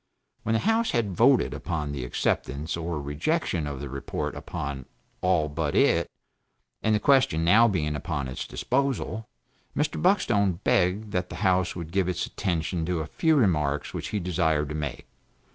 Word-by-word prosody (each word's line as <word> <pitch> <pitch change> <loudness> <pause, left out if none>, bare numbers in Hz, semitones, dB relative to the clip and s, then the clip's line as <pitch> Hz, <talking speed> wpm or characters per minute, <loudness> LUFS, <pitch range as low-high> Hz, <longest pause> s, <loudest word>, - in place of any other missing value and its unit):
When 110 - -1
the 110 - +3
House 225 +2 +2
had 110 -4 0
voted 125 +5 +4
upon 75 -5 -3
the 70 -3 -4
acceptance 70 +4 -1
or 85 -1 -3
rejection 75 - -1
of 70 -2 -5
the 70 - -5
report 70 +1 -4
upon 70 -3 -5 0.3
all 90 -4 +2
but 75 0 -2
it, - - +3 0.7
and 110 -1 +2
the - - +2
question 115 - +3
now 115 +7 +6
being 75 -8 0
upon 75 -3 -3
its 65 - -5
disposal 130 -4 -1 0.5
Mr. 150 - 0
Buckstone 115 - +3
begged 100 +4 +1
that 90 -2 -1
the - - -7
House 90 -1 +2
would 85 -2 -6
give 95 0 +1
its 90 - -1
attention 85 -1 -2
to 90 -3 0
a - - -3
few 160 - +2
remarks 75 - +1
which - - -4
he 105 - -2
desired 80 -5 0
to 75 - -4
make. 75 -2 -4
90 Hz, 170 wpm, -26 LUFS, 75-110 Hz, 0.7 s, now